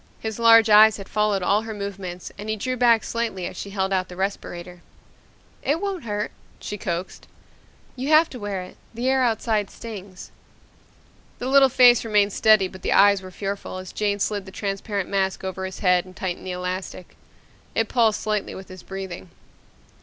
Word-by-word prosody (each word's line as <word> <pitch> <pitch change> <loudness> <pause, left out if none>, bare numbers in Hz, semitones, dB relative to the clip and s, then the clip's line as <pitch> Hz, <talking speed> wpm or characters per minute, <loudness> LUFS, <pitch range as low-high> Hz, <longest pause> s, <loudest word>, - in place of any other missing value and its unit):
His 220 0 -5
large 230 -1 +7
eyes 215 0 +7
had 195 - -9
followed 210 -3 0
all 200 +4 +2
her 220 -1 -6
movements 195 -3 -6
and 210 +1 -7
he 215 - 0
drew 255 +4 -2
back 235 -3 +4
slightly 230 -6 -3
as - - -6
she 200 - -6
held 195 -1 -1
out 185 -1 0
the 180 - -10
respirator. 180 -2 -5 0.8
"It 295 +4 0
won't 390 -7 -4
hurt," 210 -1 -3 0.3
she 210 - -5
coaxed. 180 -2 -5 0.7
"You 260 +1 -4
have 315 +1 +6
to 250 - -8
wear 200 -3 -4
it. 180 - -13 0.2
The 240 +2 -2
air 265 0 +3
outside 220 -3 0
stings." 200 -5 -9 1.1
The - - -6
little 270 0 +6
face 245 -2 +6
remained 210 -3 +2
steady 215 -3 +4
but 185 0 -12
the - - 0
eyes 200 -1 +5
were 185 - -9
fearful 195 0 -5
as 185 0 -8
Jane 205 -1 -1
slid 205 -1 -2
the - - -9
transparent 200 0 -3
mask 190 -1 -1
over 190 0 -4
his 190 - -7
head 180 -2 +3
and 185 0 -15
tightened 185 0 -4
the - - -3
elastic. 180 0 -5 0.6
It 225 - +1
pulsed 225 -4 +2
slightly 210 -1 -2
with 190 - -10
his 185 -1 -10
breathing. 190 -2 -7
200 Hz, 185 wpm, -23 LUFS, 190-225 Hz, 1.1 s, large